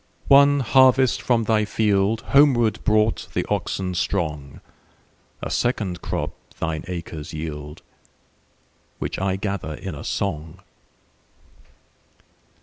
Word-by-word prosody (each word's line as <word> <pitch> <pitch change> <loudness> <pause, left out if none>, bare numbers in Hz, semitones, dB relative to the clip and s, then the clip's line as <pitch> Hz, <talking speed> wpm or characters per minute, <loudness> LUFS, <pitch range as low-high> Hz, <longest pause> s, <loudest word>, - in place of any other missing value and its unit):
One 140 0 +6
harvest 130 0 +4
from 120 -2 +1
thy 110 0 +2
fieldHomeward 110 +4 +2
brought 110 0 +1
the - - 0
oxen 95 -1 -2
strong;A 75 -6 -6
second 105 -8 -1
crop - - -3 0.3
thine 80 -1 -2
acres 85 -4 -6
yield, 75 -1 -7 1.1
Which - - -4
I 95 0 0
gather 95 -5 -4
in 95 +2 -7
a 75 - -8
song. 80 -2 -3
100 Hz, 95 wpm, -23 LUFS, 80-115 Hz, 1.1 s, One